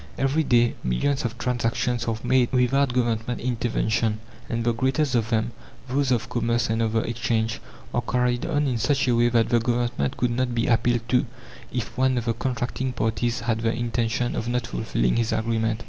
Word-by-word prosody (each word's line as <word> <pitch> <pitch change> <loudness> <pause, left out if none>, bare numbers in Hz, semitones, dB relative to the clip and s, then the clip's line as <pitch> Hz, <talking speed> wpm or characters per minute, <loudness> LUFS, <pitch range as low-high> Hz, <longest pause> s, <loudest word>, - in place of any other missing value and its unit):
Every 135 +4 +2
day 120 -3 +3
millions 135 - 0
of 115 - -3
transactions 120 -1 -1
are 115 -1 0
made 130 -2 +3
without 130 +1 +2
Government 120 -1 -1
intervention, 115 -2 0 0.3
and 115 0 -1
the 120 0 +2
greatest 130 +4 0
of 115 -2 +1
them 115 0 0 0.4
those 135 +1 0
of 120 -1 +1
commerce 120 -1 0
and 115 +1 0
of 110 -1 0
the 110 - +2
Exchange 115 -1 -1 0.3
are - - +1
carried 125 0 0
on 150 -3 +1
in 125 -4 0
such 135 +3 +1
a 120 - +3
way 120 +1 +4
that 115 -1 +2
the 120 - +4
Government 120 - -1
could 125 -1 +1
not 125 0 -1
be 115 - +1
appealed 120 0 +1
to 125 +1 +2 0.4
if 120 -5 -4
one 130 -1 +3
of 120 - -1
the 115 - +1
contracting 130 +1 -2
parties 115 +1 -1
had 115 -1 -1
the 115 -1 +1
intention 120 0 -1
of 115 - -3
not 120 -1 0
fulfilling - - 0
his 115 -1 +1
agreement. 110 0 0
120 Hz, 195 wpm, -24 LUFS, 115-125 Hz, 0.4 s, way